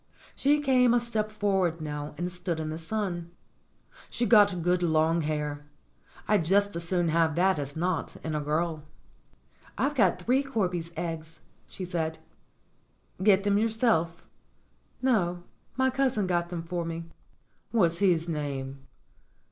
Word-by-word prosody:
She 290 +2 +3
came 250 -4 +4
a - - +4
step 220 -3 -2
forward 195 -6 0
now 150 -1 -5
and 175 +1 -3
stood 175 -2 -3
in 155 -1 -3
the 160 - -5
sun. 175 -2 -3 0.8
She'd 240 0 -2
got 205 -6 +5
good 180 +1 +2
long 165 0 +2
hair. 150 -1 -3 0.6
I'd 210 -5 +3
just 200 +4 +2
as 170 - -2
soon 175 -2 +1
have 160 -1 +2
that 185 -1 +3
as 145 0 -5
not, 175 +1 -2
in 160 - -3
a 150 - -1
girl. 155 +2 -1 1.0
"I've 290 - +1
got 195 -10 +3
three 245 +9 +2
corby's 185 -11 -2
eggs," 165 -1 -5 0.3
she 185 - -7
said. 160 -2 -2 1.0
"Get 195 -1 +5
them 205 0 +2
yourself 220 -7 +1 0.4
?" - - -39
"No; 180 -9 +1 0.3
my 260 0 +3
cousin 260 -6 +1
got 175 -1 0
them 170 -2 -4
for 170 0 -3
me." 165 0 -5 0.6
"What's 170 -7 +2
his 175 -4 +3
name?" 140 -4 -4
175 Hz, 150 wpm, -28 LUFS, 160-205 Hz, 1.0 s, got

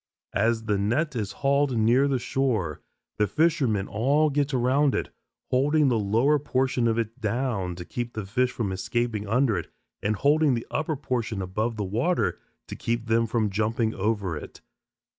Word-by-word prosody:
As 115 +2 +1
the 105 -3 0
net 125 +10 0
is 105 -4 -2
hauled 140 -2 +2
near 120 +5 +4
the 135 -2 +1
shore, 115 - -1 0.4
the 105 - +2
fishermen 120 - +1
all 140 +9 +2
get 145 0 0
around 130 +2 +2
it, - - -3 0.4
holding 145 +3 +3
the 115 -3 +2
lower 115 +9 +2
portion 130 -3 0
of 115 0 +1
it 115 +2 -3
down 110 -5 -1
to 90 0 -8
keep 120 +3 -5
the 110 -2 -4
fish 125 +6 +1
from 105 -5 -2
escaping 110 +2 -2
under 115 -3 +2
it - - -9 0.3
and 105 +1 0
holding 145 +3 +3
the 115 - -4
upper 155 0 -1
portion 120 -6 -2
above 105 +5 -2
the 105 - -1
water 120 - 0 0.3
to - - -7
keep 115 0 -2
them 115 0 +2
from 110 -2 0
jumping 110 +2 0
over 100 -3 -1
it. 75 - -9
115 Hz, 175 wpm, -26 LUFS, 105-135 Hz, 0.4 s, near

